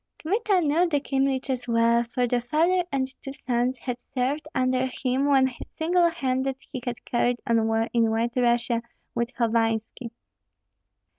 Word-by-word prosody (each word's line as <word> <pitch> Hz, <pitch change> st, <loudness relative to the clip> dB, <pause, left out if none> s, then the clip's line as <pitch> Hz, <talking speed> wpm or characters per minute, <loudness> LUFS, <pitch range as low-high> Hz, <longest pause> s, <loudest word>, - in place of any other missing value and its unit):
Kmita 400 Hz, +2 st, +1 dB
knew 325 Hz, +3 st, +2 dB
the 295 Hz, -3 st, +2 dB
Kyemliches 270 Hz, -2 st, -1 dB
well, 235 Hz, 0 st, +3 dB
for 245 Hz, +1 st, -1 dB
the 245 Hz, 0 st, 0 dB
father 330 Hz, +9 st, +2 dB
and 265 Hz, -1 st, -1 dB
two 270 Hz, -, -7 dB
sons 250 Hz, -2 st, -1 dB
had 250 Hz, 0 st, -5 dB
served 275 Hz, +5 st, -2 dB
under 255 Hz, 0 st, +1 dB, 0.2 s
him 260 Hz, +2 st, +1 dB
when 265 Hz, -2 st, +4 dB, 0.2 s
single 340 Hz, +2 st, +3 dB
handed 265 Hz, -4 st, -1 dB
he 265 Hz, -2 st, -8 dB
had 245 Hz, -2 st, -5 dB
carried 245 Hz, 0 st, +1 dB
on 230 Hz, -3 st, +2 dB
war 225 Hz, 0 st, +1 dB
in 230 Hz, -2 st, +3 dB
White 230 Hz, +2 st, 0 dB
Russia 240 Hz, -1 st, +2 dB, 0.3 s
with 235 Hz, +1 st, -1 dB
Hovanski. 225 Hz, 0 st, 0 dB
255 Hz, 150 wpm, -25 LUFS, 235-275 Hz, 0.3 s, when